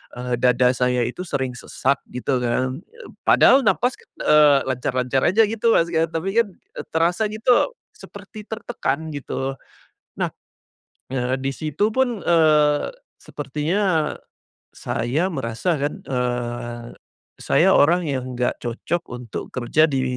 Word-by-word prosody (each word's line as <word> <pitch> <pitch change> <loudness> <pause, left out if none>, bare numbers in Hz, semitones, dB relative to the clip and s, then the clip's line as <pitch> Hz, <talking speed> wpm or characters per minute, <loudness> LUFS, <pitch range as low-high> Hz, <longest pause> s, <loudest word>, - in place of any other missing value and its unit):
eee, 125 -1 -3
dada 125 0 +4
saya 125 -1 +1
itu 120 +7 -5
sering 130 -4 -2
sesak 130 +2 -1 0.2
gitu 125 +1 0
kan. 130 +3 -1 0.2
Eb 485 - -12 0.2
padahal 270 - +6
napas, 245 +3 +1 0.2
eee, 150 -2 +5
lancar-lancar 130 0 -1
aja 225 +5 +4
gitu 225 +1 +1
Mas 170 0 +2
kan, 165 -1 +2
tapi 165 +4 -3
kan 230 - +3 0.5
terasa 175 +6 +2
gitu 235 - +2 0.2
seperti 210 - -12
tertekan 215 -9 -3
gitu. 135 0 -3 0.7
Nah, - - 0 0.8
eee, 130 -1 0
di 135 +1 -2
situ 155 +9 -1
pun, 245 -4 0
eee, 150 -3 +3 0.3
sepertinya 155 +4 -1 0.6
saya 135 +10 -1
merasakan, 145 +3 -2
eee, 120 -2 -3 0.5
saya - - +3
orang 170 +4 +4
yang 130 -3 -3
nggak 125 0 -1
cocok 120 +8 -2
untuk 125 -2 -7
kerja 140 +6 +2
di, 135 -3 0
145 Hz, 125 wpm, -22 LUFS, 125-180 Hz, 0.8 s, padahal